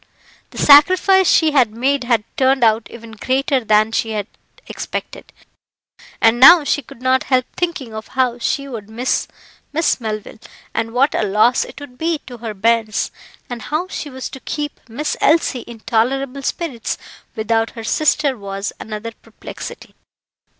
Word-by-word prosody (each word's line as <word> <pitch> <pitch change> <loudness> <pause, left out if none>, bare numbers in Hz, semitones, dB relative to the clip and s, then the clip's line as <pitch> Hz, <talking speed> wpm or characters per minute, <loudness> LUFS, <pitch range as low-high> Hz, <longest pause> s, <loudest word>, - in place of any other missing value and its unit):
The - - -14
sacrifice 370 +6 +6
she 320 -2 +4
had 260 -6 +4
made 260 +3 0
had 235 -3 +2
turned 265 -1 +2
out 220 0 +2
even 230 -1 -11
greater 260 +3 0
than 215 0 +3
she 225 - -1
had 205 -2 -2 0.4
expected, - - -6 0.9
and 225 +1 +4
now 325 +5 +9
she 290 - 0
could 245 -1 -15
not 260 0 +2
help 255 -2 +2
thinking 335 -10 -3
of 220 0 -7
how 250 -2 +1
she 280 +3 -1
would 220 -6 -8
miss 240 +4 -1 0.4
Miss 310 -3 +1
Melville, 215 -1 -5 0.3
and 225 0 -2
what 260 +5 +2
a - - 0
loss 215 +4 +3
it - - -11
would 265 -3 -12
be 330 0 0
to 245 -2 -10
her 220 -2 -6
bairns; 220 +1 +1 0.4
and 240 -2 -6
how 310 +9 -2
she 300 - -5
was 260 -1 -6
to 265 - -9
keep 295 +2 -5
Miss 290 +7 -3
Elsie 310 -4 +3
in 235 -2 -11
tolerable 265 +5 0
spirits 270 -5 -3 0.4
without 225 +1 0
her 225 - -6
sister 295 +3 +1
was 200 -1 -5
another 215 +1 -6
perplexity. - - -10
245 Hz, 160 wpm, -19 LUFS, 225-280 Hz, 0.9 s, now